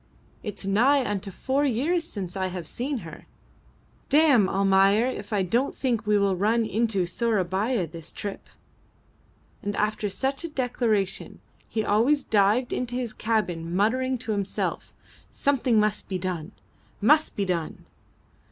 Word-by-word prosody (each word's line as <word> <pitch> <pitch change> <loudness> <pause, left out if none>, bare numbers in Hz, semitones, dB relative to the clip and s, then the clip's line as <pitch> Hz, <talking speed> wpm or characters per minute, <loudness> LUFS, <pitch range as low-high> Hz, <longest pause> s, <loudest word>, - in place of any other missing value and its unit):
"It's 205 -3 -5
nigh 250 +8 +3
unto 200 -1 -3
four 265 +9 -1
years 290 +7 +1
since 195 - -5
I 190 -1 -1
have 180 -2 -6
seen 255 - -3
her! 160 -1 -11 0.8
Damme, 280 -9 +5
Almayer, 195 +3 +4
if 255 -1 -4
I 205 -3 +1
don't 235 +9 0
think 235 -5 -1
we 210 -1 +4
will 200 -1 +2
run 220 +5 +2
into 215 -3 0
Sourabaya 205 +1 0
this 165 0 -10
trip." 200 -1 -7 1.1
And 205 0 -3
after 210 0 0
such 270 - -1
a 335 - -4
declaration 235 -8 -1 0.3
he 220 -1 -1
always 260 +8 +3
dived 215 +4 +2
into 245 -1 -3
his 245 -3 -3
cabin 175 -7 -1
muttering 255 +6 +1
to 220 - -2
himself, 200 -2 -2 0.4
"Something 255 -5 +2
must 210 0 0
be 190 - -1
done 180 -1 -4 0.5
must 300 +9 +3
be 200 - -1
done." 170 -4 -3
215 Hz, 145 wpm, -26 LUFS, 195-250 Hz, 1.1 s, Damme